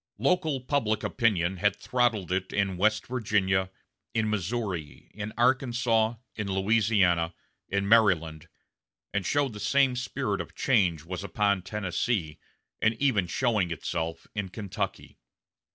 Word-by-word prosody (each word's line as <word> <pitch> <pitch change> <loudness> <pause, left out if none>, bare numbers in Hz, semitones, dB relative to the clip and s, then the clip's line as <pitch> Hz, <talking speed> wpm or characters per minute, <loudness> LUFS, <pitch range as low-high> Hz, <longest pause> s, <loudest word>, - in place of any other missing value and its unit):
Local 160 -7 +1
public 115 -5 0
opinion 95 -7 +1
had 100 +2 +2
throttled 115 -8 0
it 95 0 -1
in 100 -2 0
West 110 +4 +2
Virginia, 100 -6 +1 0.5
in 110 -1 +1
Missouri, 95 -6 -3
in 105 +1 -5
Arkansas, 120 -2 +2 0.2
in 105 -3 -4
Louisiana, 95 -4 +2 0.3
in 100 0 0
Maryland, 90 -8 +3 0.7
and 100 -1 0
the 135 -3 0
same 130 +5 +3
spirit 125 +1 -2
of - - -10
change 90 - +2
was 90 +2 -5
upon 100 -1 +1
Tennessee, 95 -3 -2 0.4
and 110 +1 +3
even 115 -8 +1
showing 110 -3 +1
itself 80 0 -3
in 105 -3 -3
Kentucky. 100 -1 -5
105 Hz, 120 wpm, -28 LUFS, 95-115 Hz, 0.7 s, Maryland